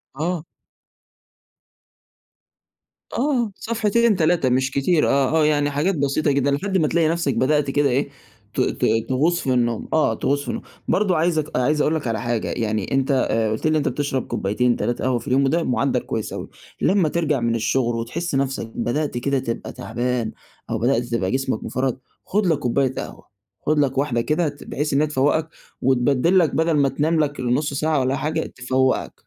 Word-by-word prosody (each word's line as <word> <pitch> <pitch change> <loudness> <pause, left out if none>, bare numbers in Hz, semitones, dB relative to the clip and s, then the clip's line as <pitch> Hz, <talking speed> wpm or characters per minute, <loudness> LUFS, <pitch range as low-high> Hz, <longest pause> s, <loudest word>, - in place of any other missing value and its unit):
آه. 165 +2 -2 2.7
آه 245 -5 0
صفحتين 230 0 +1
3 160 -5 +2
مش 130 +1 +1
كتير، 150 +4 +2
آه، 135 0 +2
آه، 150 - +4
يعني 145 -1 +2
حاجات 160 +7 0
بسيطة 140 +1 +1
جدًا 140 0 +1
لحد 190 +7 0
ما 155 -4 +2
تلاقي 165 0 +2
نفسك 165 -4 0
بدأت 145 +1 +2
كده 145 0 +2
إيه، 135 +3 0 0.4
ت - - 0
ت - - 0 0.2
تغُوص 160 +7 +2
في 130 - 0
النوم، 120 -2 0
آه، 155 - +3
تغُوص 140 0 0
في - - -12
النوم، - - -4 0.2
برضه 190 -4 +2
عايزك 160 -4 0
عايز 150 +4 +2
أقول 160 - +2
لك 145 -6 -3
على 115 -1 -1
حاجة، 120 -2 -1
يعني 110 -3 -2
أنت 135 +1 +1 0.2
آآ 110 -1 +1
قُلت 110 - -3
لي - - +4
إن 155 - +2
أنت 150 - +1
بتشرَب 135 0 -2
كوبايتين 120 +5 0
3 120 - -2
قهوة 130 -2 +1
في - - -12
اليوم 135 +1 +3
وده 165 +5 +1
مُعدَّل 125 - +1
كويس - - -4
أوي، - - -6 0.3
لمّا 185 -5 +3
ترجَع 155 -4 0
من 115 -1 0
الشغل 120 +1 0
وتحس 135 +8 -3
نفسك 135 -3 -1
بدأت 145 +2 -1
كده 135 +2 0
تبقى 115 -3 -4
تعبان 120 0 -2 0.4
أو 115 - -1
بدأت 120 +1 +2
تبقى 115 -6 -2
جسمك 130 0 -1
مفرهد، 130 -1 -2 0.3
خُد 205 0 0
لك 160 -4 +2
كوباية 130 +1 +1
قهوة، - - -7 0.4
خُد 155 0 +2
لك 135 -2 +1
واحدة 130 -4 +1
كده 155 +4 0
ت 145 - -12
بحيث 150 0 -3
إن 140 - +3
هي 155 - +2
تفوّقك 150 +3 +1 0.3
وتبدِّل 135 +7 +3
لك 165 -4 +1
بدَل 160 0 +2
ما 140 -1 +3
تنام 155 +5 0
لك 145 -2 -1
نُص 130 +4 0
ساعة 155 +1 +1
والّا 130 +1 +1
حاجة 155 +2 -1
تفوّقك. 130 +1 0
140 Hz, 185 wpm, -22 LUFS, 125-155 Hz, 2.7 s, آه